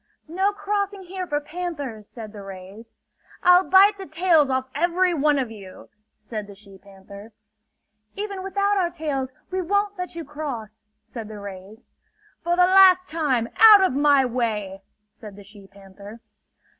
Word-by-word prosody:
"No 380 +5 0
crossing 405 -1 -3
here 370 0 -6
for 295 -2 -1
panthers!" 290 - -7
said 220 -3 -10
the 205 - -10
rays. 195 +4 -11 0.5
"I'll 360 +1 +6
bite 395 +2 +5
the 385 - -8
tails 320 -2 +2
off 260 0 -1
every 350 +4 +1
one 295 -2 +2
of 255 -4 -2
you!" 195 -4 -13 0.3
said 215 -1 -7
the 200 - -12
she 195 -1 -16
panther. 200 +2 -14 0.8
"Even 400 -1 -5
without 400 +2 -1
our 350 -2 0
tails, 290 -6 -4 0.2
we 375 0 -1
won't 405 +2 -1
let 360 -2 -6
you 335 -2 -6
cross!" 255 -8 -7 0.2
said 225 0 -9
the 215 -1 -9
rays. 200 +3 -11 0.6
"For 345 +1 0
the 360 0 +5
last 370 -1 +5
time, 270 -8 -1
out 420 -1 +8
of 375 - +1
my 285 -1 +3
way!" 215 -6 -3 0.3
said 210 -2 -12
the 205 - -13
she 200 0 -15
panther. 200 +2 -14
285 Hz, 160 wpm, -23 LUFS, -, 0.8 s, out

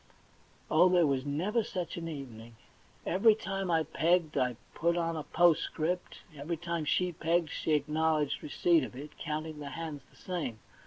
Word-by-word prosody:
Oh, 170 +4 +6
there 180 -2 +5
was 135 -1 0
never 190 +11 0
such 180 -4 -4
an 165 -1 -5
evening! 120 -7 -8 0.5
Every 210 +4 +5
time 195 -2 -3
I 165 -2 +3
pegged 160 +1 +1
I 125 -3 +1 0.2
put 170 +1 +1
on 165 -1 0
a 155 - -3
postscript; 175 +1 +1
every 150 +4 -3
time 170 -1 -3
she 180 +4 +1
pegged 165 0 0
she 155 - -1
acknowledged 150 0 +1
receipt 165 +1 +2
of 130 - -7
it, 145 +3 -8
counting 155 0 -4
the 145 -1 -6
hands 155 -1 -6
the - - -24
same. 170 - -4
160 Hz, 165 wpm, -31 LUFS, 150-175 Hz, 0.5 s, Oh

